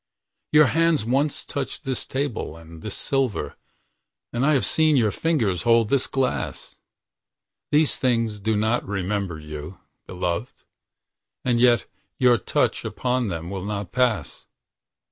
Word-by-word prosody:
Your 150 0 +7
hands 165 -2 +2
once 135 +5 0
touched 140 +2 -5
this 135 -3 -2
table 130 - -3
and 80 0 -13
this 105 - -5
silver, 135 -6 -1 0.8
And 120 +2 0
I 155 +2 +4
have 130 -7 +2
seen 155 -2 +3
your 110 -4 +3
fingers 115 - 0
hold 115 -2 +3
this 140 -2 +2
glass. 135 -1 -2 0.9
These 150 0 +4
things 115 -4 0
do 110 +2 0
not 110 +3 +1
remember 95 -2 -2
you, 75 +3 -8 0.3
beloved:And 95 +5 -5
yet 120 -1 +4 0.3
your 125 -3 +4
touch - - 0
upon 125 -1 -1
them 85 -1 -4
will 95 -2 -4
not 100 -2 -4
pass. 125 -4 0
115 Hz, 130 wpm, -24 LUFS, 100-135 Hz, 0.9 s, Your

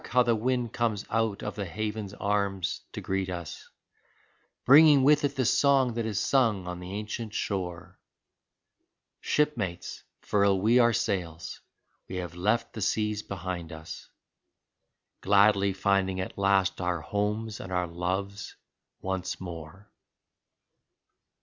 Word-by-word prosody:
how 125 0 +4
the 120 -1 +2
wind 120 +1 -1
comes 110 -4 -1
out 115 -2 0
of - - -3
the 100 - -3
haven's 105 +2 -4
arms 100 -2 -1
to - - -6
greet 95 0 -2
us, 85 -3 -7 1.0
Bringing 145 0 +8
with 150 +2 +5
it 145 0 0
the 130 -2 0
song 135 -1 +3
that 115 -1 -2
is 105 -3 -1
sung 115 -9 +2
on 90 0 -5
the 90 +1 -8
ancient 110 +1 -5
shore! 90 -2 -4 1.2
Shipmates, 115 - -1 0.2
furl 100 -2 +2
we 115 +5 +4
our 120 -1 +5
sails 95 -8 -2 0.2
— - - -46
we 95 - -5
have 90 -2 -4
left 105 +6 0
the 110 - -6
seas 105 +1 0
behind 90 -4 -5
us, 80 0 -9 1.1
Gladly 100 0 +4
finding 95 0 +1
at 95 - -4
last 95 -2 +2
our 90 -2 -1
homes 105 +4 -2
and 95 - -8
our 90 -1 0
loves 95 +4 -4 0.5
once 95 -1 -3
more. 85 +2 -9
100 Hz, 135 wpm, -28 LUFS, 90-115 Hz, 1.2 s, Bringing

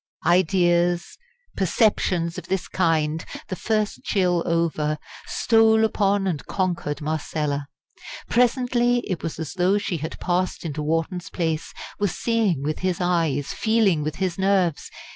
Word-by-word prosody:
Ideas, 175 - +2 0.4
perceptions 180 -3 +1
of - - -13
this 190 -1 -2
kind 160 -3 +1 0.3
the 185 - -2
first 215 +1 -1
chill 180 -3 +1
over 160 -3 0 0.3
stole 220 -1 +4
upon 200 -2 +1
and 170 -7 -2
conquered 175 -6 -2
Marcella. 150 -2 -2 0.6
Presently 245 0 +2
it 185 -5 -3
was 165 - -4
as 160 -3 -5
though 185 +2 +2
she 195 -4 -2
had 155 +1 -6
passed 180 0 -1
into 150 -1 -3
Wharton's 165 +3 -2
place, 160 -3 -2 0.3
was 205 -3 -1
seeing 220 - +1
with 155 +1 -2
his 185 -2 -1
eyes, 165 -6 0
feeling 220 -8 +2
with 155 +1 -3
his 185 -1 -2
nerves. 190 -5 +1
175 Hz, 135 wpm, -23 LUFS, 160-200 Hz, 0.6 s, stole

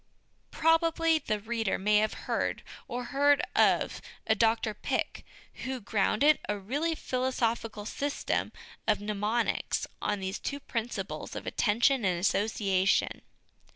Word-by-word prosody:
Probably 325 0 +3
the 215 -7 -2
reader 225 -1 -1
may 210 +2 +3
have 215 +1 +2
heard, - - -1 0.2
or 245 +1 -4
heard 285 +1 +5 0.2
of, - - +3 0.2
a 220 - +4
Dr 225 0 +2
Pick, - - -2 0.4
who 260 0 -3
grounded 225 +7 +3
a 210 - 0
really 290 +12 -1
philosophical 235 -6 -1
system 285 +5 -2 0.4
of 215 -1 +3
mnemonics 210 +3 -1 0.2
on 205 -1 0
these 190 +2 -3
two 280 - -4
principles 235 -3 -4
of - - -6
attention 235 +4 +2
and 180 -3 +1
association. 195 -1 +1
225 Hz, 120 wpm, -29 LUFS, 210-275 Hz, 0.4 s, heard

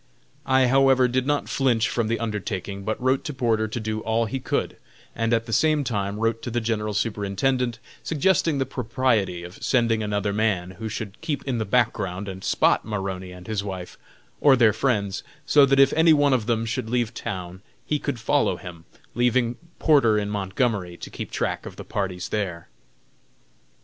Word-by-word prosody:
I 130 0 +4
however 135 0 +4
did 130 +2 0
not 145 -1 0
flinch 120 -5 +2
from 115 -2 -1
the 115 0 -1
undertaking, 100 -3 -4
but 110 +2 -2
wrote 130 +1 +1
to 150 - -4
Porter 115 -4 +1
to 110 +2 -4
do 110 -1 -3
all 110 +1 0
he 130 +5 -3
could, 130 - -2 0.4
and 115 0 0
at 115 -1 +2
the 115 - -5
same 155 +1 +3
time 100 -5 -2
wrote 115 +1 0
to - - -4
the 120 +1 0
General 105 -2 -2
Superintendent, 115 +4 0 0.2
suggesting 165 -1 +1
the 135 - 0
propriety 115 -8 0
of 90 +2 -11
sending 115 -3 +2
another 105 -1 -1
man, 100 -4 0
who 110 0 -4
should 110 -1 -6
keep 145 -3 -3
in 130 -4 -1
the 110 - -1
background 100 -4 0
and 95 0 -7
"spot" - - +2
Maroney 95 -3 -4
and 90 0 -11
his 110 -2 -2
wife, 95 -3 -6 0.4
or 140 -2 +6
their 115 -4 +5
friends, 105 -5 0 0.2
so 145 -1 +6
that 135 0 +3
if 135 0 +6
any 160 0 +5
one 145 -2 +4
of 120 -4 0
them 115 -1 +1
should 115 0 -3
leave 120 -1 0
town 90 -5 -6 0.2
he 150 - 0
could 140 -5 -3
follow 140 +6 +1
him, 85 -3 -10 0.3
leaving 120 0 +2 0.2
Porter 135 -9 +4
in 105 -1 -1
Montgomery, 100 -2 -1
to - - -9
keep - - -6
track - - -2
of - - -9
the - - -9
parties 95 -3 -3
there. 90 - -3
115 Hz, 185 wpm, -24 LUFS, 100-130 Hz, 0.4 s, or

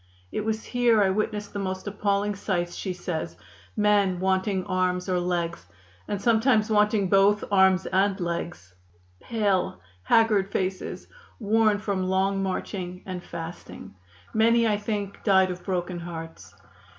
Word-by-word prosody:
"It 215 - -2
was 220 0 -2
here 240 -4 +3
I 190 - +2
witnessed 210 +1 -2
the 205 - -3
most 190 -1 -4
appalling 205 0 0
sights," 175 -3 -2
she 190 - -4
says; 175 -2 -4 0.4
"men 205 -3 +3
wanting 190 0 0
arms 185 -1 0
or 180 -1 +1
legs, 170 - -2 0.4
and 205 - -2
sometimes 220 0 +3
wanting 210 -1 +3
both 200 +2 +4
arms 190 -1 +4
and 195 +1 +1
legs 170 - -4 0.5
pale, 200 - 0 0.2
haggard 210 - +3
faces, 185 -1 -3 0.3
worn 215 -1 +3
from 200 -2 -2
long 195 +1 +1
marching 185 -1 -4
and 185 -2 -5
fasting. 165 0 -8 0.4
Many, 230 +1 +4
I 210 -1 +2
think, 205 -1 -4
died 190 -3 +4
of 180 0 -8
broken 180 -1 -2
hearts. 165 -1 -8
195 Hz, 140 wpm, -26 LUFS, 180-210 Hz, 0.5 s, both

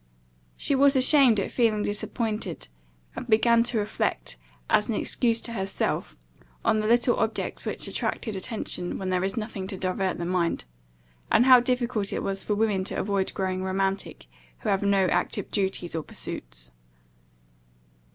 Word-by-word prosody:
She - - 0
was 275 +1 +5
ashamed 260 -4 +5
at 195 - -2
feeling 220 -4 +2
disappointed; 210 - -3 0.5
and - - -6
began 230 +1 +4
to 240 -1 0
reflect, - - -1 0.3
as 210 - +2
an 225 - 0
excuse 230 +2 +1
to 235 - -3
herself, 195 - -2 0.5
on 215 - +3
the 215 - -1
little 240 +2 +3
objects - - -2
which - - -3
attract - - -2
attention 200 -3 -3
when 190 -1 -4
there 180 0 +1
is 195 +3 -1
nothing 215 -4 -4
to 195 -1 -5
divert 185 0 -1
the 170 - -3
mind; 175 - 0 0.7
and 240 - +5
how 255 -1 +9
difficult 240 -4 -1
it - - -2
was 195 0 -3
for 210 - -1
women 205 -3 +1
to - - -3
avoid 195 -1 0
growing 185 -1 -1
romantic, 195 +1 -2 0.4
who 220 - -2
have 195 -1 +2
no 200 -1 +3
active - - -1
duties 190 -3 -1
or 160 - -2
pursuits. - - -9
205 Hz, 160 wpm, -26 LUFS, 190-230 Hz, 0.7 s, how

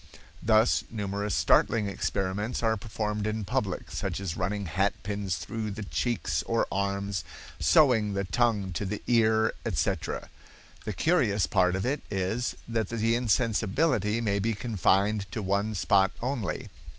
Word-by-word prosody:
Thus 110 +1 +3
numerous 100 -2 -2
startling 110 -2 +3
experiments 100 +4 -2
are 110 -1 +3
performed 105 -1 -3
in 110 -1 -2
public, - - -2
such - - -3
as 95 -5 -3
running 100 +2 -2
hatpins 100 +1 -1
through 110 +6 -4
the 105 +1 -5
cheeks 100 - -1
or 115 - +2
arms, 100 -2 -1 0.4
sewing 110 - +4
the 100 0 -1
tongue 105 -2 +1
to 100 - -2
the 105 +2 -4
ear, 110 -2 +3
etc. - - -2 0.6
The 105 - -2
curious 110 - +2
part 90 -2 +2
of 95 - -2
it 140 +4 -1
is 100 +5 -1
that 115 -3 -1
the 115 0 +1
insensibility 115 0 +1
may 100 -3 0
be 110 +2 0
confined 100 -1 +1
to 110 - -3
one 100 +3 0
spot 95 +1 +3
only. 125 -4 -3
105 Hz, 140 wpm, -28 LUFS, 100-115 Hz, 0.6 s, sewing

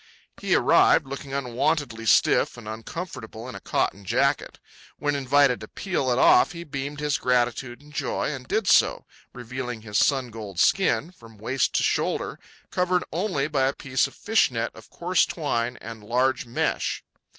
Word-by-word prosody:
He - - +2
arrived, - - +4
looking 135 +1 -7
unwontedly 130 -2 -1
stiff 110 - +3
and 115 -3 -10
uncomfortable 115 0 -7
in 130 - -7
a - - -7
cotton 100 +1 -1
jacket. 95 - 0 0.4
When 145 - -1
invited 140 -1 +3
to 110 - -9
peel 155 - -2
it 120 - +1
off, 160 - +5
he 170 0 -7
beamed 140 -1 -5
his 150 -1 0
gratitude 120 0 0
and 150 0 -17
joy, - - -2
and - - -8
did 425 +2 0
so, - - +4 0.3
revealing 125 -2 -6
his 105 -2 0
sun 130 -4 +2
gold 105 -5 -7
skin, 185 -3 +2
from 115 -10 -16
waist 120 +5 -1
to - - +2
shoulder, - - -1 0.3
covered 180 0 +1
only 165 -5 -1
by 135 -3 +1
a 135 - 0
piece 130 -1 0
of 135 - -15
fish 220 +2 +2
net 115 -2 -2
of - - -15
coarse 180 +2 +1
twine 120 -6 -2
and 115 -2 -9
large 125 +4 +1
of - - -19
mesh. 115 - -1
130 Hz, 175 wpm, -25 LUFS, 115-150 Hz, 0.4 s, off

